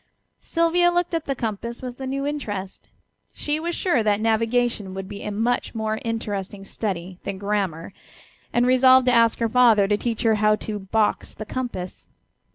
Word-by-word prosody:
Sylvia 335 +1 +2
looked 350 0 0
at 330 -1 -1
the 275 - -1
compass 235 +1 -4
with 250 +1 -7
a 265 - -3
new 275 +1 -2
interest; 205 -10 -5 0.4
she 295 +1 -2
was 340 +1 -3
sure 320 -10 +1
that 210 -1 +2
navigation 225 -2 0
would 195 0 -5
be 200 - -8
a - - -4
much 230 +4 -1
more 220 0 -2
interesting 205 -4 -4
study 185 -3 -4
than 200 -1 -4
grammar, 195 -4 -2 0.6
and 240 0 +2
resolved 255 0 +6
to 250 - +4
ask 230 -1 +4
her 230 - +1
father 225 -4 +5
to 205 +1 +2
teach 235 +1 -2
her 225 -1 +4
how 215 0 +5
to 210 -1 -5
"box 210 +2 0
the 215 - -7
compass." 235 -7 -5
225 Hz, 175 wpm, -23 LUFS, 205-255 Hz, 0.6 s, resolved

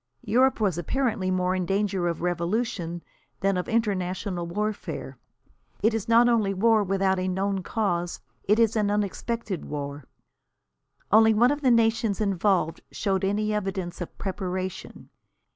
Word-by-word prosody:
Europe 255 +5 +3
was 190 -6 +1
apparently 220 - -1
more 185 0 +1
in 185 -1 -1
danger 195 -1 0
of 170 0 -3
revolution 175 -1 -2 0.4
than 195 0 +2
of 180 - -3
international 190 -5 -1
warfare. 210 +4 -4 0.6
It 220 +2 +4
is 225 -3 -2
not 235 +1 +6
only 215 -5 +2
war 220 +2 +4
without 190 -1 +1
a 185 - -1
known 190 +1 -1
cause, 175 -4 -2 0.3
it 210 +2 +3
is 230 -1 +3
an 210 -2 +1
unexpected 205 -1 -2
war. 145 -1 -5 1.1
Only 220 +1 +6
one 240 +4 +5
of 290 0 -2
the 265 - +3
nations 225 -3 +2
involved 195 -4 +1
showed 195 -2 -1
any 210 +2 0
evidence 190 -4 -3
of 175 - -7
preparation. 185 -1 -5
195 Hz, 145 wpm, -26 LUFS, 180-220 Hz, 1.1 s, not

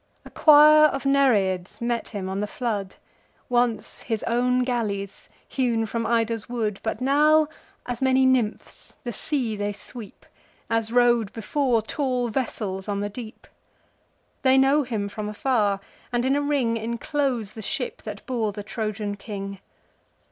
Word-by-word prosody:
A - - -12
choir 305 0 +7
of 275 -2 0
Nereids 205 -10 +2
meet 235 0 -2
him 200 -4 -5
on 190 +1 -3
the 210 - -1
flood, 205 -4 -3 0.5
Once 240 -2 0
his 225 -3 -3
own 250 +2 +1
galleys, 205 -6 -3 0.2
hewn 235 -4 0
from 230 +1 -2
Ida's 230 -1 0
wood; 220 -4 -2
But 220 +1 -3
now, 300 +3 +4 0.4
as 245 0 -5
many 265 0 +4
nymphs, 250 -5 -1
the 240 - -3
sea 250 -7 -1
they 205 0 -2
sweep, 210 +1 -10 0.5
As 225 -1 0
rode, 240 -3 +3
before, 235 0 0
tall 250 -1 -1
vessels 210 -6 -3
on 200 0 -1
the 205 - -2
deep. 220 +1 -9 1.0
They 260 0 +4
know 270 +3 +4
him 225 -6 -3
from 210 +1 -5
afar; 210 -3 +1 0.3
and 240 0 0
in 270 +1 +2
a 290 - +1
ring 275 -6 +1
Enclose 235 0 -2
the 220 - -9
ship 245 +4 -3
that 210 -2 -8
bore 230 -5 -1
the 205 - -6
Trojan 215 -1 -4
king. 195 -2 -6
230 Hz, 150 wpm, -24 LUFS, 210-260 Hz, 1.0 s, choir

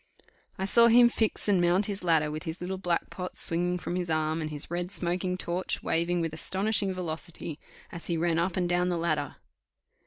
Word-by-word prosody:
I 190 - -2
saw 235 +4 +6
him 240 +1 +7
fix 220 -2 -1
and 195 -3 +3
mount 175 +3 +3
his 200 -2 -4
ladder 160 -3 +2
with 155 +1 -5
his 160 +2 -6
little 185 +1 -4
black 175 -2 -1
pot 180 -1 -6
swinging 175 +2 +2
from 175 - -4
his 180 -1 -3
arm, 155 0 0
and 155 - -3
his 150 +1 -4
red 175 +1 -2
smoking 180 0 0
torch 180 +1 -3
waving 170 +1 0
with 165 -2 -2
astonishing 195 +4 0
velocity, 165 -3 -6 0.3
as 170 - -8
he 170 - -1
ran 165 0 +1
up 175 +1 -1
and 180 -1 +1
down 175 +1 +1
the 175 - -1
ladder. 155 -4 -1
175 Hz, 205 wpm, -28 LUFS, 165-185 Hz, 0.3 s, him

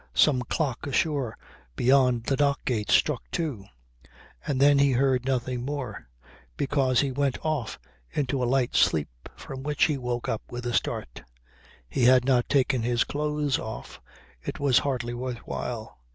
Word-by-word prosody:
Some 135 -5 +4
clock 130 +1 -2
ashore 140 -4 0 0.4
beyond 125 - +3
the 135 - 0
dock 140 0 +1
gates 110 -5 +2
struck 150 -5 +2
two. 145 - -3 0.8
And 135 -3 0
then 140 0 +5
he 140 -1 +4
heard 130 0 +2
nothing 125 -2 -1
more, 130 - -5 0.5
because 135 -3 +2
he 140 -2 -1
went 140 0 0
off 150 -8 -1 0.3
into 135 -2 -1
a - - +2
light 130 -2 +1
sleep - - +1
from 135 -1 -8
which 145 +1 0
he 145 -3 +2
woke 125 -1 -3
up 110 - -1
with 120 0 -6
a 120 - -2
start. - - -2 0.7
He 120 - +1
had 125 0 +6
not 125 -2 +2
taken 130 -2 +2
his 120 0 +1
clothes 150 -2 -1
off, 110 - -8 0.4
it - - -6
was 135 -3 +4
hardly 125 -4 -2
worth 125 0 -4
while. 110 - -5
130 Hz, 160 wpm, -26 LUFS, 120-140 Hz, 0.8 s, had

